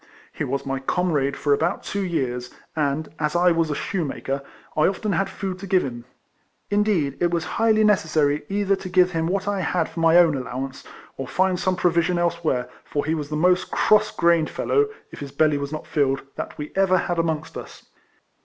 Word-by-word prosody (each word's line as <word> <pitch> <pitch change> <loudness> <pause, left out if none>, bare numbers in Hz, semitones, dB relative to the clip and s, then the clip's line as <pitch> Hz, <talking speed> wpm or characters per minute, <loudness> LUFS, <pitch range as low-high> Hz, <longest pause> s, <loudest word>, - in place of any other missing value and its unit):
He - - -3
was 140 +2 -2
my 135 0 -2
comrade 140 -2 0
for 145 - +2
about 165 +6 0
two 200 - -3
years; 125 -8 -2 0.3
and, 150 0 0
as 150 0 -1
I 175 +1 +4
was 165 -1 +1
a 150 - -1
shoemaker, 140 -6 -3 0.3
I 155 - +4
often 200 +2 -1
had 195 +2 0
food 190 -2 -5
to 195 - -7
give 185 -1 +3
him; 120 -3 -6 0.7
indeed 205 -9 +1
it 175 - +2
was 170 -1 -1 0.2
highly 220 -1 +4
necessary 155 -8 +2
either 200 0 +1
to 190 - -8
give 180 0 +4
him 165 -1 -1
what 190 +2 -1
I 205 -1 0
had 170 -1 0
for 165 - -8
my 165 +1 +5
own 170 -3 +6
allowance, 130 +1 -5 0.3
or 135 - -5
find 185 +3 +1
some 185 -1 +1
provision 175 0 +2
elsewhere, 170 -7 0 0.2
for 145 -1 -3
he 155 - 0
was 150 -3 -3
the 155 - -3
most 180 +4 +2
cross 215 0 +3
grained 170 -4 +2
fellow, 430 0 +1 0.2
if - - -10
his 140 -1 -7
belly 150 0 +2
was 140 0 -4
not 155 0 -5
filled, 140 -3 0
that - - -6
we 150 0 -6
ever 190 -1 +4
had 175 -2 -1
amongst 160 -2 -2
us. - - -9
165 Hz, 200 wpm, -23 LUFS, 145-185 Hz, 0.7 s, own